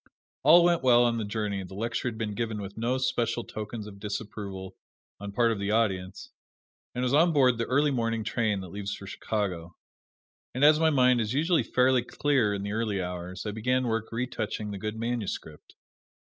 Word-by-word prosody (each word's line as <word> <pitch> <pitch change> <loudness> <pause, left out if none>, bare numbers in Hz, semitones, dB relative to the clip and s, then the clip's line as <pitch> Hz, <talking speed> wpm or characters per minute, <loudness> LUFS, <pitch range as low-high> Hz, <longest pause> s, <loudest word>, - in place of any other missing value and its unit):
All 165 +5 +7
went 170 -1 +3
well 120 -2 +5
on 120 -1 +1
the - - -2
journey, 100 -2 -2
the 95 +1 -10
lecture 115 +4 -2
had 115 -2 -3
been 110 -2 -3
given 110 -1 -3
with 100 0 -7
no 120 +3 0
special 120 -2 0
tokens 110 0 -6
of 100 -2 -11
disapproval 100 -2 -6 0.4
on 100 0 -6
part 115 +2 +2
of 110 - -2
the 100 0 -2
audience, 95 -4 -1 0.6
and 125 - -1
I - - +1
was 125 - 0
on 165 +3 +5
board 130 -5 +4
the 115 - -1
early 145 +3 +2
morning 115 -3 -1
train 105 -3 0
that 95 - -8
leaves 100 +2 -4
for 100 - -10
Chicago. 90 -4 -3 0.8
And 135 +3 +4
as 155 +1 +6
my 160 0 +4
mind 125 -4 +4
is 110 +1 -2
usually 165 +5 +2
fairly 130 0 +3
clear 125 -2 +1
in 100 - -4
the 100 - -3
early 110 -2 -1
hours, 90 +1 -5
I 105 - -2
began 125 +4 0
work 115 -1 -2
retouching 115 -3 -3
the 100 - -6
good 105 +1 -4
manuscript. 115 -3 -4
115 Hz, 200 wpm, -28 LUFS, 100-125 Hz, 0.8 s, All